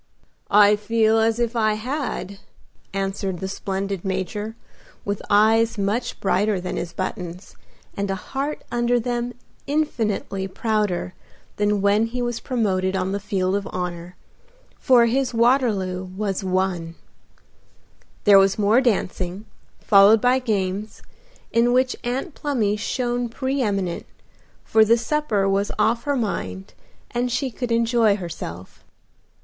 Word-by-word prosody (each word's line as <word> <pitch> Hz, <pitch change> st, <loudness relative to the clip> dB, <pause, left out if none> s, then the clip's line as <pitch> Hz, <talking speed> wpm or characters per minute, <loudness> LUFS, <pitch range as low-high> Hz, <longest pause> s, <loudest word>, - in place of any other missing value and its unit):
"I 205 Hz, 0 st, +6 dB
feel 220 Hz, +1 st, +2 dB
as 225 Hz, 0 st, +2 dB
if 240 Hz, 0 st, -1 dB
I 215 Hz, -2 st, +2 dB
had," 245 Hz, -4 st, -4 dB, 0.5 s
answered 195 Hz, -1 st, -2 dB
the 190 Hz, -, -3 dB
splendid 195 Hz, -1 st, -3 dB
Major, 200 Hz, +3 st, -3 dB, 0.5 s
with 200 Hz, 0 st, -2 dB
eyes 225 Hz, +2 st, +4 dB
much 210 Hz, +5 st, -1 dB
brighter 200 Hz, +1 st, +1 dB
than 180 Hz, -, -4 dB
his 170 Hz, -, -4 dB
buttons, 180 Hz, 0 st, -6 dB, 0.4 s
and 200 Hz, 0 st, -2 dB
a 195 Hz, -, 0 dB
heart 275 Hz, +9 st, -4 dB
under 240 Hz, 0 st, +2 dB
them 240 Hz, +1 st, -2 dB, 0.3 s
infinitely 220 Hz, -9 st, -1 dB
prouder 205 Hz, -3 st, -1 dB, 0.4 s
than 205 Hz, -1 st, +1 dB
when 205 Hz, +3 st, +3 dB
he 250 Hz, +2 st, -5 dB
was 240 Hz, -1 st, -2 dB
promoted 190 Hz, -8 st, 0 dB
on 190 Hz, 0 st, -1 dB
the 200 Hz, -, -1 dB
field 195 Hz, -2 st, -1 dB
of 200 Hz, -1 st, -2 dB
honor, 180 Hz, -1 st, -5 dB, 0.6 s
for 245 Hz, -3 st, +5 dB
his 250 Hz, +1 st, 0 dB
Waterloo 225 Hz, -7 st, +2 dB
was 195 Hz, +1 st, -3 dB
won. 185 Hz, -3 st, -1 dB, 1.3 s
There 200 Hz, -1 st, +8 dB
was 195 Hz, 0 st, +3 dB
more 215 Hz, +4 st, +4 dB
dancing, 195 Hz, -4 st, -1 dB, 0.4 s
followed 200 Hz, +2 st, +6 dB
by 250 Hz, +4 st, +3 dB
games, 205 Hz, -3 st, -2 dB, 0.5 s
in 235 Hz, +1 st, +3 dB
which 255 Hz, 0 st, +2 dB
Aunt 260 Hz, +7 st, -3 dB
Plumy 235 Hz, -10 st, 0 dB
shone 240 Hz, +2 st, -2 dB
pre 265 Hz, +4 st, -2 dB
eminent, 195 Hz, -6 st, -2 dB, 0.6 s
for 220 Hz, 0 st, +4 dB
the 230 Hz, +2 st, +4 dB
supper 230 Hz, -5 st, 0 dB
was 195 Hz, +1 st, +1 dB
off 235 Hz, +1 st, +1 dB
her 285 Hz, -1 st, +1 dB
mind 95 Hz, -, -3 dB, 0.4 s
and 245 Hz, +1 st, -1 dB
she 260 Hz, +2 st, -1 dB
could 245 Hz, +1 st, -4 dB
enjoy 230 Hz, -2 st, +3 dB
herself. 165 Hz, -, -8 dB
210 Hz, 130 wpm, -23 LUFS, 195-240 Hz, 1.3 s, There